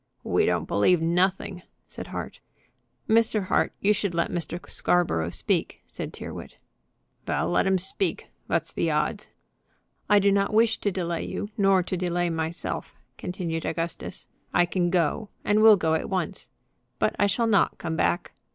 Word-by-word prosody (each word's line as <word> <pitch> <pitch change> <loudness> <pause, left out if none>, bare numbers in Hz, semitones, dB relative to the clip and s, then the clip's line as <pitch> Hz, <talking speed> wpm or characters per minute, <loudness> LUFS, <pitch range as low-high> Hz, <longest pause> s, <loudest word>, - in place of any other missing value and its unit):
"We - - +2
don't - - 0
believe 170 - +3
nothing," 180 +2 0 0.3
said - - -8
Hart. - - -6 0.7
"Mr. 220 -2 +3
Hart, - - +2
you 210 +1 +4
should 200 -4 -2
let 170 - 0
Mr. 170 0 -3
Scarborough 125 - +1
speak," - - -1
said - - -6
Tyrrwhit. - - -8 0.7
"Vell, 80 +3 0
let 90 - +2
'im 190 0 +3
speak. 190 - -2 0.2
Vat's - - -1
the - - 0
odds?" - - -1 0.8
"I 210 - +6
do 200 0 +4
not 200 +1 +1
wish 225 0 +3
to 205 - 0
delay 170 -3 -2
you, 205 - -4
nor 195 -2 +4
to 185 - -3
delay 175 -1 0
myself," 160 +1 -4 0.2
continued 170 -3 -3
Augustus. 165 +1 -4 0.3
"I 175 - +5
can 175 0 0
go, 180 +4 0 0.2
and 210 +1 +3
will 220 -1 +8
go, 160 -3 +1
at 160 - -1
once. 190 -1 -3 0.5
But - - +1
I 205 - +4
shall 230 +4 +1
not 210 -3 +3
come 160 -1 -3
back. 85 - 0
180 Hz, 160 wpm, -26 LUFS, 170-200 Hz, 0.8 s, will